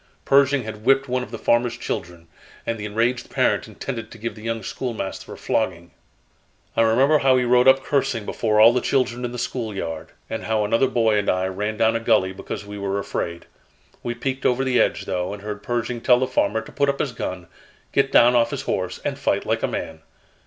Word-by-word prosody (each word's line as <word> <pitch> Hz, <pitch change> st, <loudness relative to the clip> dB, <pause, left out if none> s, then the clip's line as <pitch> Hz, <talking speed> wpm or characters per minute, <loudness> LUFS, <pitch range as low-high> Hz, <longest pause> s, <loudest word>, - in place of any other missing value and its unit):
Pershing 140 Hz, -1 st, +4 dB
had 110 Hz, -1 st, -8 dB
whipped 135 Hz, +2 st, +3 dB
one 125 Hz, 0 st, 0 dB
of 125 Hz, -, -7 dB
the -, -, -6 dB
farmer's 120 Hz, 0 st, +1 dB
children, 85 Hz, -6 st, -5 dB, 0.4 s
and 115 Hz, -1 st, -2 dB
the 105 Hz, -, -5 dB
enraged 115 Hz, +4 st, -1 dB
parent -, -, +1 dB
intended 115 Hz, -4 st, -6 dB
to -, -, -12 dB
give 115 Hz, +1 st, -4 dB
the 110 Hz, -, -13 dB
young 115 Hz, -1 st, -3 dB
schoolmaster 110 Hz, -4 st, -5 dB
a -, -, -10 dB
flogging. 85 Hz, 0 st, -2 dB, 0.8 s
"I -, -, +3 dB
remember 130 Hz, +7 st, +4 dB
how 130 Hz, -2 st, +4 dB
he 125 Hz, -, +2 dB
rode 125 Hz, +1 st, +4 dB
up 135 Hz, 0 st, +6 dB
cursing 130 Hz, -6 st, 0 dB
before 105 Hz, 0 st, 0 dB
all 115 Hz, +2 st, +8 dB
the 125 Hz, -, +1 dB
children 125 Hz, -2 st, 0 dB
in 120 Hz, -, -2 dB
the 125 Hz, -, -6 dB
schoolyard, 105 Hz, -10 st, -4 dB
and 110 Hz, -, -5 dB
how 110 Hz, -1 st, +1 dB
another 115 Hz, +5 st, +2 dB
boy 110 Hz, -4 st, +2 dB
and 100 Hz, -, -1 dB
I 90 Hz, 0 st, +1 dB
ran 105 Hz, +3 st, -3 dB
down 115 Hz, +1 st, +3 dB
a -, -, +1 dB
gully 95 Hz, -4 st, +2 dB
because 100 Hz, -, -7 dB
we 105 Hz, 0 st, -8 dB
were 100 Hz, 0 st, -2 dB
afraid. 85 Hz, -3 st, -4 dB, 0.6 s
We 120 Hz, 0 st, -3 dB
peeked 130 Hz, +2 st, -3 dB
over 125 Hz, +1 st, +2 dB
the 130 Hz, -2 st, +3 dB
edge, -, -, 0 dB
though, 90 Hz, +2 st, -2 dB
and 100 Hz, -1 st, -9 dB
heard 105 Hz, -1 st, -5 dB
Pershing 120 Hz, +1 st, -2 dB
tell 125 Hz, +1 st, +5 dB
the 130 Hz, -, +1 dB
farmer 110 Hz, -3 st, 0 dB
to 110 Hz, -, -12 dB
put 140 Hz, -1 st, +1 dB
up 140 Hz, -, 0 dB
his 140 Hz, -, -1 dB
gun, 95 Hz, -6 st, -5 dB, 0.5 s
get -, -, +2 dB
down 120 Hz, +1 st, +6 dB
off 115 Hz, -1 st, +4 dB
his -, -, -4 dB
horse, -, -, -2 dB
and -, -, -2 dB
fight -, -, 0 dB
like -, -, 0 dB
a -, -, +1 dB
man. 80 Hz, 0 st, -5 dB
115 Hz, 220 wpm, -23 LUFS, 105-125 Hz, 0.8 s, all